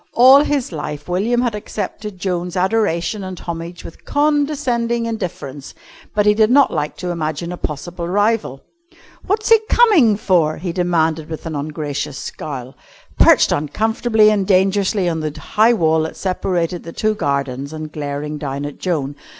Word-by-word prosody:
All 260 +4 +7
his 285 -7 -1
life, 150 -2 -6
William 210 +7 +1
had 240 -3 0
accepted 210 -1 -5
Joan's 180 -1 -3
adoration 190 -1 0
and 185 -1 -6
homage 170 0 -7
with - - -11
condescending 285 -6 0
indifference, 165 -11 -6 0.4
but 210 -1 +2
he 210 - +5
did 215 0 +3
not 275 +2 +4
like 150 -1 -2
to 180 -1 -3
imagine 170 +1 -3
a - - -4
possible 170 +4 -5
rival. 205 - 0 0.7
"What's 430 +3 0
he 450 -1 +7
coming 340 - +5
for?" 170 -7 +2
he 175 +1 -4
demanded 165 -3 0
with 160 +1 -7
an 160 -2 -4
ungracious 145 -1 -4
scowl, 135 -3 -6 0.5
perched - - +6
uncomfortably 220 - +2
and 200 -3 0
dangerously 195 0 +2
on 165 -2 -1
the 155 0 -4
high 220 +8 +3
wall 160 -6 +2
that 160 - -4
separated 180 -2 -1
the 165 - -9
two 215 0 0
gardens 140 -5 -2
and 155 -1 -7
glaring 150 0 -4
down 140 -1 -4
at 145 - -7
Joan. 145 -6 -2
180 Hz, 160 wpm, -19 LUFS, 155-215 Hz, 0.7 s, All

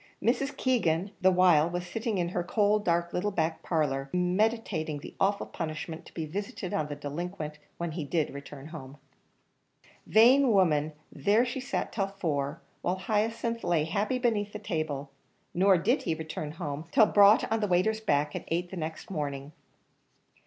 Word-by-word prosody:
Mrs. 275 +4 0
Keegan 195 -8 +1
the 190 - +6
while 180 -4 +5
was 175 +1 -3
sitting 220 +3 -2
in 175 -1 0
her 175 0 -2
cold, 210 +3 +2
dark, 170 -2 0
little 195 +4 0
back 160 -4 -1
parlour, 140 -5 -1
meditating 180 -3 0
the 145 - -9
awful 200 +1 +1
punishment 160 0 -6
to - - -15
be 160 - -3
visited 190 +2 -5
on 155 - 0
the 145 - -5
delinquent 150 +1 -5 0.2
when 170 -1 -3
he 160 0 -4
did 155 +1 -1
return 140 +1 -9
home. 145 -4 -9 1.1
Vain 255 +5 +6
woman, 155 -6 +3 0.2
there 205 - +2
she 260 +2 -3
sat 265 - -3
till 195 -3 -1
four, 160 -6 -2 0.2
while 180 - 0
Hyacinth 230 +4 -1
lay 170 -3 +2
happy 205 +10 0
beneath 220 -4 0
the - - -4
table; 155 -8 -3 0.4
nor 190 +1 +5
did 220 - +1
he 165 - -1
return 155 -1 -5
home, 155 -2 -5
till 220 - +6
brought 205 +1 +6
on 225 - +2
the 210 - 0
waiter's 200 +5 +2
back, 150 -6 +1
at - - -5
eight 175 +2 -2
the 190 - -6
next 160 +3 -5
morning. 145 -4 -4
175 Hz, 170 wpm, -29 LUFS, 155-205 Hz, 1.1 s, the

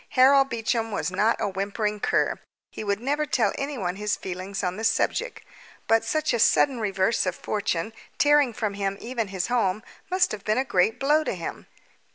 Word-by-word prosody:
Harold 270 +1 +6
Beecham 225 -1 -1
was 160 -4 -2
not 210 +5 +1
a - - 0
whimpering 205 +2 -2
cur. - - +1 0.3
He - - -6
would 200 -1 -1
never 290 +5 -1
tell - - +1
anyone 240 -11 -3
his 210 0 -1
feelings 190 +2 -5
on 180 0 -1
the 220 - -6
subject; - - 0 0.4
but 225 0 +3
such 310 +6 0
a 235 - 0
sudden 255 +3 +3
reverse 195 0 +1
of 180 - -1
fortune, 205 -1 -2 0.2
tearing 290 -3 +4
from 215 -2 -3
him 200 -1 -2
even 235 -2 -3
his 190 -2 -2
home, 215 -4 0 0.3
must 365 0 +2
have 205 -2 -6
been 215 +2 +1
a 260 - +1
great 205 -2 +1
blow 295 +3 +3
to - - -2
him. - - -7
220 Hz, 190 wpm, -25 LUFS, 195-260 Hz, 0.4 s, Harold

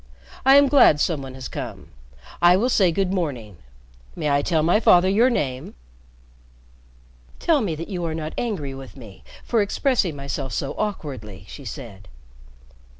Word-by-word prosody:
"I 270 - +8
am 285 0 +6
glad 265 - +5
some 155 -2 0
one 130 -1 -9
has 130 -2 -7
come. - - -7 0.5
I 175 +1 +6
will 240 +6 +1
say 190 -7 +3
good 190 +2 -1
morning. 125 - -4 0.6
May 150 - -1
I 140 0 +3
tell 160 0 0
my 175 +6 +3
father 180 -4 +5
your 220 +7 +4
name?" 130 - -3 1.6
"Tell 320 -5 +2
me 180 -8 -2
that 165 +2 -7
you 180 -4 -4
are 160 -1 -3
not 155 -1 -5
angry 185 - -3
with 135 0 -11
me 110 -7 -13 0.2
for 230 -3 +1
expressing 205 - 0
myself 140 -2 -5
so 135 - -3
awkwardly," 135 - -5
she - - -11
said. 95 -1 -9
165 Hz, 160 wpm, -22 LUFS, 135-205 Hz, 1.6 s, I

